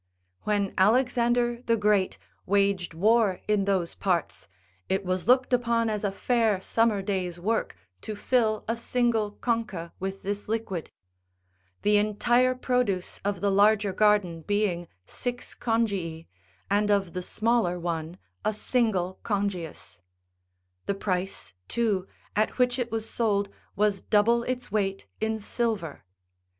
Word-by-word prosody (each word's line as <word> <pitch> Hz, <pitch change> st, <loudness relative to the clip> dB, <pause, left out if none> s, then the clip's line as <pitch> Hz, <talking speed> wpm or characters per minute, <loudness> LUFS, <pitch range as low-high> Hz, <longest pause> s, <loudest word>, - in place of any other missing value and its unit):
When 205 Hz, -2 st, 0 dB
Alexander 240 Hz, +2 st, +3 dB
the 230 Hz, -2 st, +1 dB
Great 205 Hz, -, +2 dB, 0.3 s
waged 195 Hz, -3 st, +1 dB
war 210 Hz, +1 st, +3 dB
in 210 Hz, -2 st, +2 dB
those 190 Hz, -4 st, 0 dB
parts, 170 Hz, -, -1 dB, 0.4 s
it 190 Hz, 0 st, 0 dB
was 185 Hz, +1 st, -1 dB
looked 255 Hz, +1 st, +4 dB
upon 235 Hz, -2 st, +2 dB
as 210 Hz, -1 st, -3 dB
a 200 Hz, -, +1 dB
fair 225 Hz, -1 st, +1 dB
summer 215 Hz, 0 st, +1 dB
day's 185 Hz, -3 st, -2 dB
work 220 Hz, +5 st, -1 dB, 0.3 s
to 215 Hz, -, -5 dB
fill 220 Hz, -1 st, +1 dB
a 230 Hz, -, 0 dB
single 230 Hz, -3 st, 0 dB
concha77 210 Hz, -8 st, -2 dB
with 195 Hz, +1 st, -4 dB
this 205 Hz, +1 st, -3 dB
liquid; 220 Hz, -7 st, -3 dB, 0.9 s
the 210 Hz, 0 st, +4 dB
entire 240 Hz, +5 st, +2 dB
produce 250 Hz, -8 st, -1 dB
of 200 Hz, -2 st, -2 dB
the 200 Hz, 0 st, +2 dB
larger 205 Hz, 0 st, +4 dB
garden 205 Hz, -6 st, +2 dB
being 195 Hz, -2 st, 0 dB, 0.2 s
six 245 Hz, -, -4 dB
congii, 200 Hz, -9 st, -1 dB, 0.4 s
and 205 Hz, +1 st, +2 dB
of 195 Hz, -4 st, +1 dB
the 180 Hz, -, -3 dB
smaller 215 Hz, -2 st, +1 dB
one 165 Hz, 0 st, -3 dB, 0.3 s
a 215 Hz, -, +1 dB
single 210 Hz, -5 st, 0 dB
congius; 195 Hz, -, -3 dB, 0.9 s
the 200 Hz, -, 0 dB
price, 190 Hz, -, -3 dB
too, 210 Hz, -5 st, 0 dB, 0.3 s
at 215 Hz, +1 st, +1 dB
which 250 Hz, 0 st, +2 dB
it 240 Hz, -2 st, -2 dB
was 225 Hz, 0 st, -2 dB
sold 205 Hz, -4 st, 0 dB, 0.3 s
was 205 Hz, -1 st, +1 dB
double 230 Hz, +3 st, +3 dB
its 250 Hz, -3 st, -3 dB
weight 195 Hz, -2 st, -1 dB
in 220 Hz, 0 st, -1 dB
silver. 210 Hz, -, -2 dB
205 Hz, 135 wpm, -27 LUFS, 190-230 Hz, 0.9 s, looked